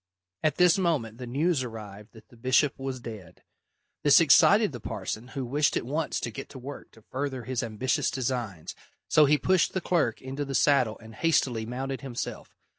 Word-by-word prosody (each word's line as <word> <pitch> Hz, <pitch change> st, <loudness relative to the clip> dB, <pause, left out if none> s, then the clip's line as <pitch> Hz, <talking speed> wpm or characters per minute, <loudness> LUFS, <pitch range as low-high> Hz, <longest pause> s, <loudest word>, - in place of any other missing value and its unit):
At 155 Hz, -3 st, +1 dB
this 180 Hz, +1 st, +4 dB
moment 130 Hz, -, -1 dB
the 125 Hz, -, -6 dB
news 145 Hz, +3 st, +1 dB
arrived 105 Hz, -3 st, -9 dB
that 110 Hz, -, -16 dB
the -, -, -18 dB
bishop 130 Hz, +4 st, +2 dB
was 135 Hz, -1 st, -4 dB
dead. 110 Hz, -8 st, -10 dB, 0.6 s
This -, -, +7 dB
excited -, -, +6 dB
the -, -, -7 dB
parson, 110 Hz, +3 st, -5 dB
who 135 Hz, -, -2 dB
wished 145 Hz, +5 st, +1 dB
at -, -, -3 dB
once 150 Hz, +5 st, -2 dB
to 120 Hz, -, -3 dB
get 135 Hz, +5 st, -8 dB
to -, -, -10 dB
work 135 Hz, +3 st, -9 dB
to 110 Hz, -, -19 dB
further 135 Hz, 0 st, -4 dB
his 125 Hz, +1 st, -2 dB
ambitious 120 Hz, +2 st, -1 dB
designs, 120 Hz, -10 st, -3 dB, 0.3 s
so 155 Hz, -, +5 dB
he 150 Hz, +1 st, +4 dB
pushed 185 Hz, +3 st, +2 dB
the 185 Hz, -, 0 dB
clerk 165 Hz, -10 st, 0 dB
into 135 Hz, +2 st, -5 dB
the 135 Hz, -1 st, -4 dB
saddle 130 Hz, -7 st, +3 dB
and 110 Hz, 0 st, -13 dB
hastily 120 Hz, -5 st, +1 dB
mounted 135 Hz, +2 st, -4 dB
himself. 130 Hz, -4 st, -6 dB
130 Hz, 190 wpm, -27 LUFS, 115-145 Hz, 0.6 s, This